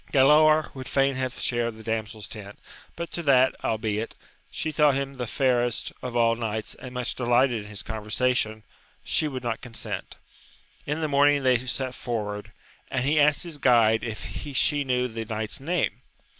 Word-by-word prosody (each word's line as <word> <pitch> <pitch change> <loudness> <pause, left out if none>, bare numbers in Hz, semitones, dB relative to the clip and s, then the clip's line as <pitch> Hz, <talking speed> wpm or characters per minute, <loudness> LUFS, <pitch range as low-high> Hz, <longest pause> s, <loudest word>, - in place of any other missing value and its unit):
Galaor 155 +3 +5
would 130 -2 -7
fain 135 0 +2
have 130 -1 -3
shared 120 -2 -1
the 110 - -11
damsel's 110 -1 -3
tent, 105 -2 -8 0.4
but 170 0 -5
to 170 - -3
that, 130 -4 +4
albeit, 110 0 -1 0.3
she 155 - -3
thought 150 -3 +4
him 140 0 -2
the 125 -3 -4
fairest 120 -1 0
of 125 -1 -5
all 115 -1 +4
knights 110 -2 -3
and 125 - -10
much 125 -1 -2
delighted 120 -2 +2
in - - -11
his 105 -1 -5
conversation, 110 0 -1 0.4
she 155 - +1
would 130 -3 -5
not 115 -2 -2
COD 120 -2 -10
sent. - - -4 0.7
In 150 +3 -1
the 155 - +1
morning 145 0 +4
they 125 -2 +3
set 130 0 -2
forward, 105 -5 -4 0.4
and 130 -1 -1
he 150 +2 +3
asked 150 0 +4
his 165 -4 -5
guide 115 -4 +4
if 115 -2 -5 0.3
she 145 +2 +2
knew 125 -1 +1
the 115 -1 -5
knight's 110 +4 -3
name? 165 +5 -1
125 Hz, 175 wpm, -26 LUFS, 110-140 Hz, 0.7 s, Galaor